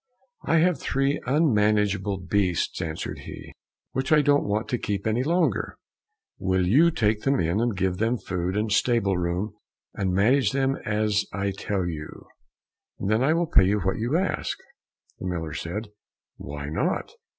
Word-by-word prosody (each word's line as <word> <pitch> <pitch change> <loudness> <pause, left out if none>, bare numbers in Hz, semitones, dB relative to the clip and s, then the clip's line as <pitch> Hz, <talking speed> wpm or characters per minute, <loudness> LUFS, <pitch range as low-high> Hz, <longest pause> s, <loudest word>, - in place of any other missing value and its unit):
"I 165 - +2
have 170 -2 +3
three 135 +2 0
unmanageable 105 - +2
beasts," 95 -2 0
answered 80 0 -4
he, - - -10 0.4
"which 130 +3 -2
I 150 -1 +6
don't 145 0 +3
want 105 +2 -1
to 125 - -1
keep 100 -1 -3
any 110 +2 +1
longer. 160 - 0 0.6
Will 95 -1 +1
you 145 - +5
take 105 -8 +1
them 135 0 +1
in, 85 +7 +1
and 120 -4 0
give 95 -1 0
them 115 +4 +1
food 90 -1 -3
and 105 0 -1
stable 110 -3 +2
room, 90 +4 -2 0.4
and 95 -2 -1
manage 125 +10 +3
them 135 0 +1
as 105 -1 +1
I 100 +1 -1
tell 95 -1 -2
you, 80 -3 -6 0.7
and 100 - -2
then 110 +2 +3
I 150 +4 +3
will 170 +1 +1
pay 125 - +4
you 100 +2 +1
what 95 - 0
you 120 +8 +1
ask." 190 +2 -1 0.6
The - - -4
miller 80 -4 -3
said, 105 +9 -4 0.5
"Why 70 +1 -6
not? 80 - -1
105 Hz, 165 wpm, -25 LUFS, 95-130 Hz, 0.7 s, I